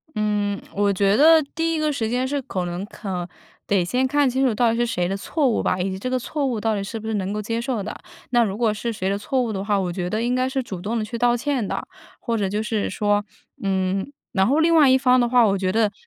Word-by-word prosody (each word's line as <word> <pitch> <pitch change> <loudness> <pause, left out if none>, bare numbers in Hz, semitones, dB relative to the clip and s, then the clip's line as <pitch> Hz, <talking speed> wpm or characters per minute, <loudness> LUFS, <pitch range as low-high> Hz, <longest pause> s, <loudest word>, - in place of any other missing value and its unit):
嗯， 210 -1 0
我 200 0 +2
觉 200 +1 +2
得 320 +5 +7
第 330 0 0
1 315 - -1
个 305 0 +1
时 225 -6 -2
间 250 +2 0
是 285 +1 -2
可 185 -7 -3
能 175 +2 -4
可 190 -5 -5 0.4
得 195 -3 +2
先 255 +8 0
看 290 0 +2
清 265 +2 +1
楚 235 - +1
到 235 0 +3
底 230 - -1
是 240 - +2
谁 180 -6 -1
的 195 - -2
错 285 +7 0
误 235 - +1
吧， 185 - 0
以 190 +2 -1
及 190 - -5
这 255 - -3
个 255 - +1
错 280 +3 -2
误 240 -5 -1
到 220 0 0
底 200 - -2
是 225 +3 -5
不 220 - -8
是 220 - -2
能 195 -1 -2
够 210 - -2
接 230 +2 -2
受 235 -5 -2
的。 215 - -5 0.4
那 240 -1 +4
如 200 -1 -2
果 225 -3 +2
是 235 +3 -3
谁 190 -2 -2
的 200 - 0
错 255 +5 -1
误 235 -3 -1
的 195 -2 -3
话， 205 -1 +1
我 180 -2 -1
觉 180 0 -3
得 215 +3 -1
应 245 +1 0
该 255 0 +1
是 265 -1 -2
主 190 -7 -7
动 225 +4 -2
地 220 - -1
去 235 - -5
道 240 0 +3
歉 255 -2 -1
的。 - - -3 0.3
或 230 -2 -2
者 200 -2 0
就 210 +2 -1
是 215 -1 -1
说 205 +1 +1 0.4
嗯， 195 +4 -1 0.2
然 190 -3 +2
后 290 +5 +3
另 335 +1 +4
外 300 -4 +6
一 260 - +6
方 255 -1 +4
的 240 - +3
话， 245 -2 +5
我 200 -1 +2
觉 185 -1 0
得 220 -1 +2
220 Hz, 305 characters per minute, -22 LUFS, 200-255 Hz, 0.4 s, 得